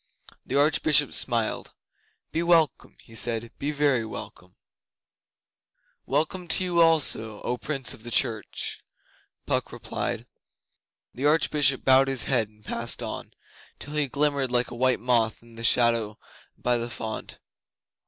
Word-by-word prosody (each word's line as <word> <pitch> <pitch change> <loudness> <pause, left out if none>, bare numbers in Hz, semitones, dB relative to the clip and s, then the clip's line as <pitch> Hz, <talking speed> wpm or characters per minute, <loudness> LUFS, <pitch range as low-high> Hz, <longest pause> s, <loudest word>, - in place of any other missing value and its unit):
The 130 - -4
Archbishop 145 0 +3
smiled. 115 -3 0 0.6
'Be 165 - -1
welcome,' 165 -5 +1 0.2
said 115 0 +1
he. 115 - -11
'Be 140 - -2
very 145 -5 +2
welcome.' 110 - -9 1.5
'Welcome 160 +6 -1
to 185 - +3
you 175 -2 +2
also, 135 -10 +3
O 125 - -1
Prince 135 0 -2
of - - -11
the 120 - -7
church,' 115 -3 -1 0.6
Puck - - -1
replied. - - -4 0.9
The 135 +4 0
Archbishop 150 -3 +2
bowed 135 0 +6
his 135 -3 0
head 115 -5 +1
and 105 0 -25
passed 115 +1 -1
on, - - -6 0.4
till 145 - -8
he 150 -2 +1
glimmered 140 -1 0
like 125 0 +1
a - - -7
white 130 +1 +2
moth 115 -2 +1
in 115 0 -18
the 115 0 -9
shadow 115 -2 +3 0.4
by 120 -1 0
the 120 +1 -4
font. 110 -1 -6
130 Hz, 140 wpm, -26 LUFS, 115-145 Hz, 1.5 s, bowed